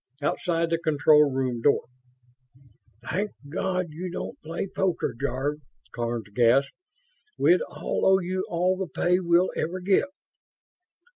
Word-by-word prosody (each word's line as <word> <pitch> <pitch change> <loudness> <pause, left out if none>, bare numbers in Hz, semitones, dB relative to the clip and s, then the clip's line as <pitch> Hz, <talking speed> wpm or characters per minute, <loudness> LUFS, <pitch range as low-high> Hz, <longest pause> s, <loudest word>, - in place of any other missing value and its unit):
Outside 165 +3 -1
the 165 - +1
control 150 -2 +4
room 130 -3 -1
door, 145 - +3 1.2
"Thank 205 +4 -2 0.2
God 185 +1 -2
you 175 +4 -5
don't 180 - -6
play 165 +4 -4
poker, 190 -7 -1
Jarve!" 140 +4 -2 0.3
Karns 115 -2 -3
gasped. 125 +5 +3 0.7
"We'd - - +4
all - - -1
owe 190 0 +6
you 185 +1 -2
all 180 +2 +1
the 190 -1 -3
pay 180 +2 +1
we'll 175 0 +3
ever 175 +4 -2
get!" 195 +8 +2
165 Hz, 130 wpm, -26 LUFS, 140-185 Hz, 1.2 s, owe